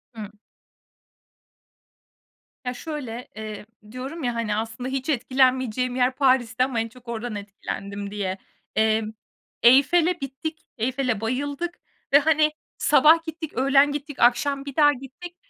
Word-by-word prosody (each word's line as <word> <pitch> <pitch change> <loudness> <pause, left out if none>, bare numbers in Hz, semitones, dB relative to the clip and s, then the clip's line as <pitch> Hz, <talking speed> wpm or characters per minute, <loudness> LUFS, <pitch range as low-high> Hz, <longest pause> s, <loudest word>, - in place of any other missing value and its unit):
Hı. 215 -2 -7 2.4
Ya, 250 - -2
şöyle, 250 -4 -6
eee, 215 -1 -7 0.3
diyorum 270 +6 -6
ya, 240 -1 -1
hani, 225 -3 -1
aslında 225 +3 -4
hiç 265 +2 -3
etkilenmeyeceğim 255 -2 +1
yer 255 0 +2
Paristi 255 -3 +2
ama 255 -3 -1
en 225 - -1
çok 250 +1 -18
oradan 235 -1 -4
etkilendim 200 0 -6
diye. 195 -2 -3 0.4
Emm, 220 0 +2 0.5
Eyfel'e 315 +8 +5
bittik, 275 +4 -5 0.2
Eyfel'e 250 -1 -1
bayıldık 285 +8 -3 0.3
ve, 285 - +9
hani, 305 0 +3 0.3
sabah 325 +2 +5
gittik, 320 -1 -6
öğlen 275 +3 +4
gittik, 290 0 -6
akşam 275 +3 +2
bir 280 -2 -7
daha 295 -1 +5
gittik. 285 +7 -10
255 Hz, 130 wpm, -24 LUFS, 225-285 Hz, 2.4 s, ve